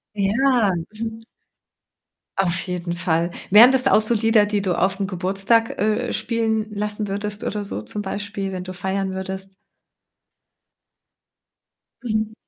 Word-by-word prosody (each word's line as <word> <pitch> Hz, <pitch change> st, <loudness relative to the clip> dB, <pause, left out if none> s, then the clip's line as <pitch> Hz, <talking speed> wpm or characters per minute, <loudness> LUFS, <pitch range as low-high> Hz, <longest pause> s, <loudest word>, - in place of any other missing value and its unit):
Ja, 215 Hz, +2 st, +2 dB
mhm. 220 Hz, +6 st, -6 dB, 1.2 s
Auf 175 Hz, -3 st, +1 dB
jeden 175 Hz, -1 st, -3 dB
Fall. 170 Hz, -1 st, 0 dB, 0.2 s
Wären 230 Hz, +6 st, +9 dB
das 265 Hz, -1 st, +2 dB
auch -, -, +5 dB
so 220 Hz, +2 st, 0 dB
Lieder, 220 Hz, -1 st, +4 dB
die 205 Hz, -1 st, -1 dB
du 190 Hz, -2 st, 0 dB
aufm 195 Hz, +1 st, +1 dB
Geburtstag, 195 Hz, +5 st, +1 dB
äh, 215 Hz, +4 st, 0 dB
spielen 225 Hz, -2 st, 0 dB
lassen 210 Hz, 0 st, -2 dB
würdest 205 Hz, +1 st, -3 dB
oder 210 Hz, -1 st, -3 dB
so 105 Hz, -, -5 dB
zum 205 Hz, -, -5 dB
Beispiel, 200 Hz, 0 st, -4 dB
wenn 180 Hz, -1 st, -5 dB
du 185 Hz, -, -6 dB
feiern 190 Hz, +1 st, -2 dB
würdest? 190 Hz, 0 st, -5 dB, 2.5 s
Mhm, 215 Hz, -1 st, -1 dB
205 Hz, 130 wpm, -22 LUFS, 190-220 Hz, 2.5 s, Wären